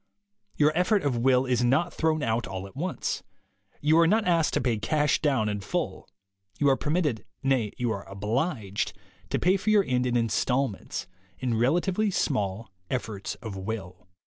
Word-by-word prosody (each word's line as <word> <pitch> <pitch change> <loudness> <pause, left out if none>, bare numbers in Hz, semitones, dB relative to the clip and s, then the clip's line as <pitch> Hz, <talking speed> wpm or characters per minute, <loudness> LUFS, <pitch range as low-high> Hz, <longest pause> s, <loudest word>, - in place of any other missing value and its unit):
Your 150 0 +4
effort 185 +4 +2
of 135 -4 0
will 130 +1 +4
is 125 -2 +1
not 155 +8 +2
thrown 155 -1 +1
out 115 -1 0
all 95 0 -5
at 100 - -13
once. 180 +6 -2 0.6
You 155 +3 +4
are 165 - +6
not 215 +4 +3
asked 170 -3 +2
to - - +3
pay 115 -4 0
cash 150 +7 +1
down 135 -8 +2
in 105 -1 -1
full. 95 - -3 0.5
You 145 - +3
are 135 - +5
permitted 150 -5 0
— - - -47
nay, 130 -6 +1
you 120 -2 0
are 100 -3 -5
obliged 105 - -2 0.2
— 90 +1 -29
to - - +1
pay 185 +2 +3
for 195 - -2
your 210 -2 +5
end 125 -5 0
in 120 -1 +1
installments, 120 +1 -1 0.3
in 120 +4 -1
relatively 175 - +2
small 105 - -1 0.2
efforts 110 -5 -3
of 110 -4 -5
will. 95 -3 -6
125 Hz, 180 wpm, -27 LUFS, 110-155 Hz, 0.6 s, are